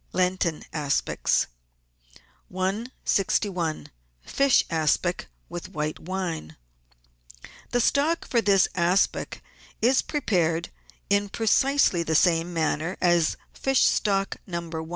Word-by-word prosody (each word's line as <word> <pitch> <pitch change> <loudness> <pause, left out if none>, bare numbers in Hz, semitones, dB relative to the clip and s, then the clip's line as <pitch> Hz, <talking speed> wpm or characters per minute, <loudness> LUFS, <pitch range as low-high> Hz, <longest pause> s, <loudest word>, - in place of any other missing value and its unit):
LENTEN 180 -3 0
ASPICS 145 -3 0 1.1
161— 190 -3 -1 0.3
FISH 275 -1 +3
ASPIC 165 +2 0 0.2
WITH 175 +1 -7
WHITE 150 -1 -3
WINE 170 - -4 1.1
The 245 - +1
stock 300 +7 +1
for 235 - +2
this 195 -3 +4
aspic 180 +2 0 0.4
is 255 +3 +3
prepared 170 - 0 0.4
in 200 0 +2
precisely 225 -2 +2
the 160 -1 -1
same 170 +1 +3
manner 165 +1 -1
as 175 -3 +2 0.2
fish 270 -1 +1
stock, 195 -2 +1
No. 170 -2 -5
i. 160 0 -5
180 Hz, 100 wpm, -25 LUFS, 165-205 Hz, 1.1 s, this